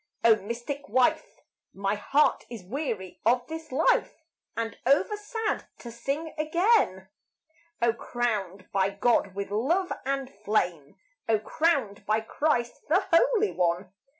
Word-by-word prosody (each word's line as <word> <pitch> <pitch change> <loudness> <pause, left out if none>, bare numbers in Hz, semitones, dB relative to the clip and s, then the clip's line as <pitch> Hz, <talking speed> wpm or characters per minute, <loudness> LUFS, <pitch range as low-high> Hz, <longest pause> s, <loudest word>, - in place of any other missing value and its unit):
O 230 -1 +8
mystic 235 +7 -6
wife! 285 +8 +1 0.3
My 195 +1 0
heart 275 +8 +2
is 230 -5 -8
weary 210 - -4
of 245 +2 +3
this 320 +1 -8
life 295 +6 +2 0.4
And 225 0 -2
over 280 - +3
sad 430 +1 -3
to 235 - -9
sing 275 +7 -3
again. 310 - +2 0.7
O 235 -1 +4
crowned 205 -6 -3
by 195 0 +2
God 200 -1 +1
with 200 0 -4
love 325 - +1
and 275 0 -1
flame! 180 -8 -1 0.3
O 220 - +5
crowned 225 -3 0
by 215 +1 +3
Christ 240 0 -1
the 350 +6 +3
Holy 430 +4 +4
One! 180 +1 -1
235 Hz, 130 wpm, -27 LUFS, 200-310 Hz, 0.7 s, O